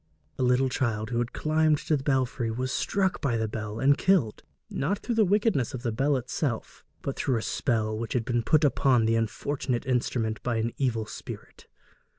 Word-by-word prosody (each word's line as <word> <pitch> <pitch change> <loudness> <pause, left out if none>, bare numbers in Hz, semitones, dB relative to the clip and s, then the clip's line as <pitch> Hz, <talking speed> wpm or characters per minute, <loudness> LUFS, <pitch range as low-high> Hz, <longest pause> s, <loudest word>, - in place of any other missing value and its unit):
A - - 0
little 125 +1 +3
child 115 -3 -1
who 120 - 0
had 120 0 -1
climbed 155 0 +2
to 155 - 0
the 140 - -2
belfry 130 -4 0
was 130 +3 -2
struck 190 +3 0
by 130 -6 +1
the 110 0 0
bell 105 0 -5
and 140 +2 +5
killed, 160 - +2 0.3
not 185 +9 -1
through 240 - -3
the 225 -1 +4
wickedness 200 - +1
of 125 - -7
the 120 - 0
bell 135 +5 +1
itself, 125 -1 -3 0.2
but 135 - -3
through 130 -4 0
a 115 - -3
spell 110 -2 0
which 115 0 -4
had 120 -3 0
been 120 -1 +1
put 155 +6 +3
upon 130 -4 +3
the 115 +1 +2
unfortunate 120 +3 -2
instrument 120 -3 -1
by 120 -1 -1
an 115 +1 -1
evil 115 -5 0
spirit. 110 - -10
125 Hz, 195 wpm, -27 LUFS, 115-145 Hz, 0.3 s, and